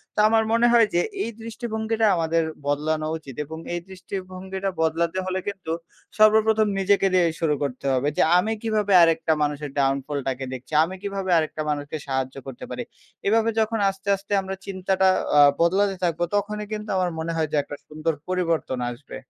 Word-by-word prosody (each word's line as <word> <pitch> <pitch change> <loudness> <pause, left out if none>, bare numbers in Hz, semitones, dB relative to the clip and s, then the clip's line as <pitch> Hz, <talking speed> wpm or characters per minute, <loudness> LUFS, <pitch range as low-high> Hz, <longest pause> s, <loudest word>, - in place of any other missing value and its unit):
তো - - -1
আমার 220 0 +3
মনে 235 +1 +4
হয় 230 -2 +6
যে 175 - +3 0.2
এই - - -3
দৃষ্টিভঙ্গিটা 225 -1 -2
আমাদের 165 0 +1 0.2
বদলানো 155 +2 0
উচিত 140 -5 -11
এবং 160 +2 -8 0.2
এই 175 - -1
দৃষ্টিভঙ্গিটা 190 +1 -5
বদলাতে 165 +2 0
হলে 185 0 -1
কিন্তু 190 -5 -4 0.5
সর্বপ্রথম 215 0 +5
নিজেকে 195 0 +3
দিয়েই 175 -3 +3
শুরু 155 -3 +1
করতে 135 -1 -4
হবে 130 +2 +1
যে, - - +4 0.2
"আমি 200 +5 +1
কীভাবে 215 -3 0
আরেকটা 165 -1 +2
মানুষের 145 0 -2
ডাউন 135 0 +3
ফলটাকে 135 -3 -3
দেখছি? 130 +4 -9
আমি 180 +3 -4
কীভাবে 195 -2 -3
আরেকটা 155 -1 -1
মানুষকে 145 +1 -3
সাহায্য 130 -1 -2
করতে 130 -2 -7
পারি?" - - -4 0.4
এভাবে 225 +2 +3
যখন 220 0 +1
আস্তে, 195 0 -9
আস্তে 195 +1 -14
আমরা 190 0 -5
চিন্তাটা 190 0 +1 0.3
আ - - +9 0.2
বদলাতে 195 +3 +3
থাকবো, 170 -1 0
তখনই 210 +1 -1
কিন্তু 210 0 -5
আমার 180 -1 +1
মনে 165 +1 -2
হয় 160 -1 0
যে - - -1
একটা 145 - -8
সুন্দর 155 +2 -2
পরিবর্তন 170 -7 -1
আসবে। 120 +4 -9
180 Hz, 175 wpm, -24 LUFS, 155-205 Hz, 0.5 s, আ